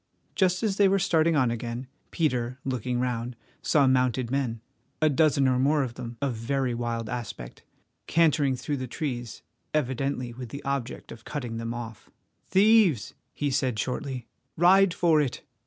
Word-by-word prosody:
Just 185 +2 +1
as 205 -3 0
they 200 - +6
were 195 +1 +3
starting 165 -3 +2
on 130 -5 +3
again, 120 +2 -4 0.2
Peter, 125 -6 -1
looking 125 -1 -2
round, 125 -1 -2 0.3
saw 145 -3 +3
mounted 130 -2 +2
men—a 135 +3 -2
dozen 140 -2 +3
or 130 -1 +2
more 145 +2 +3
of 125 -3 -4
them 120 -1 -7
of 135 -3 0
very 125 +2 -1
wild 115 -1 -3
aspect—cantering 130 - -1
through 145 +3 -3
the 130 -1 -4
trees 120 - -5 0.3
evidently 130 -3 -1
with 125 0 -8
the 140 - -7
object 140 -3 -4
of 115 - -11
cutting 120 -6 -5
them 115 0 -4
off. 115 -2 -8 0.4
"Thieves!" 195 - +4 0.2
he 145 -1 -1
said 130 -3 0
shortly. 125 +2 -3 0.3
"Ride 185 +3 +6
for 165 -3 +3
it." 135 -4 -3
130 Hz, 155 wpm, -27 LUFS, 120-150 Hz, 0.4 s, they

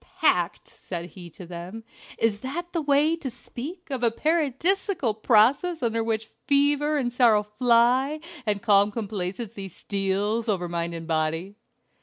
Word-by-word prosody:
"Packed!" - - +1
said 175 -1 -7
he 175 -3 -10
to 175 +3 -11
them; 175 +6 -8 0.3
"is 220 -2 +1
that 340 +9 -5
the 335 - 0
way 295 +2 +3
to 325 -5 -5
speak 290 +8 -9
of 260 -3 -2
a 235 - +4
Paradisiacal 320 - 0
process 250 +10 +3
under 230 -1 0
which 225 -1 -2 0.2
fever 290 +1 +3
and 245 -4 -1
sorrow 230 -4 +4
fly 245 +6 +2 0.2
and 205 -3 -1
calm 205 -2 +5
complacency 200 -1 -5
steals 200 +4 -1
over 180 -4 0
mind 170 0 -3
and 165 0 -6
body?" 160 +4 -1
230 Hz, 145 wpm, -25 LUFS, 200-280 Hz, 0.3 s, calm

